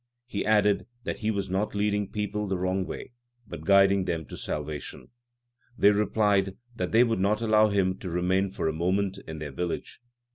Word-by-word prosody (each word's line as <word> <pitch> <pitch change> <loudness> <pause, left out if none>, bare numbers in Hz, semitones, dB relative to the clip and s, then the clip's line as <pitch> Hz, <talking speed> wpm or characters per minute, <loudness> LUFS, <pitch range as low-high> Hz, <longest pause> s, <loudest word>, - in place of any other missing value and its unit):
He 105 -5 -3
added 105 -1 +3 0.2
that - - -4
he 110 - -1
was 100 -3 -1
not 95 +3 -1
leading 105 -1 0
people 105 0 -3
the 95 -1 -1
wrong 95 +1 -1
way, - - -7 0.3
but - - -9
guiding 100 -1 +5
them 85 -3 -2
to - - -9
salvation. 75 -1 -5 0.7
They 100 - +6
replied 100 -2 +1 0.2
that 90 -4 -3
they 115 +2 +6
would 115 -4 0
not 100 +3 +2
allow 110 -1 +4
him 95 -2 +1
to 95 - -5
remain 90 +3 +1
for 95 - -3
a 80 - 0
moment 95 +4 0
in 80 0 -6
their 75 -2 -6
village. 90 +9 -4
100 Hz, 185 wpm, -27 LUFS, 90-105 Hz, 0.7 s, They